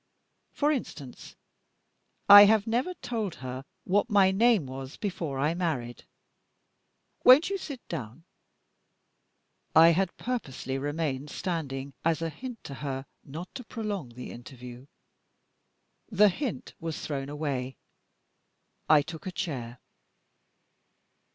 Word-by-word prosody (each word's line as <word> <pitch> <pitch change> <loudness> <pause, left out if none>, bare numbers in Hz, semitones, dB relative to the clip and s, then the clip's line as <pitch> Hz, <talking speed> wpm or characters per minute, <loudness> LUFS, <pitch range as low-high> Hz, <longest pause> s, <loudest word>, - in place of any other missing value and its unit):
For 295 +1 +1
instance, 150 - -6 0.9
I 205 0 +12
have 215 0 +4
never 245 +11 -1
told 230 - -4
her 130 +1 -7 0.2
what 205 +5 +1
my 200 -3 +5
name 220 - +3
was 130 +1 -8
before 175 -9 -3
I 150 +4 +1
married. 150 -9 -3 1.2
Won't 285 +9 +7
you 395 - 0
sit 280 -8 -8
down?" 125 -1 -6 1.5
I 165 +1 +9
had 175 +2 +1
purposely 135 - -4
remained 145 -1 -2
standing 140 -7 -4
as 165 0 +1
a 165 - -1
hint 245 - -8
to 140 - -7
her 135 -2 -4 0.2
not 160 +6 -8
to 250 - -7
prolong 210 - -4
the 125 - -8
interview. 125 +1 -11 1.2
The 210 -1 +5
hint 245 +5 -4
was 165 -1 -4
thrown 140 -2 -4
away; 140 -3 -3 1.1
I 150 -2 +6
took 160 +4 -8
a - - -3
chair. 130 -10 -5
165 Hz, 120 wpm, -28 LUFS, 135-205 Hz, 1.5 s, I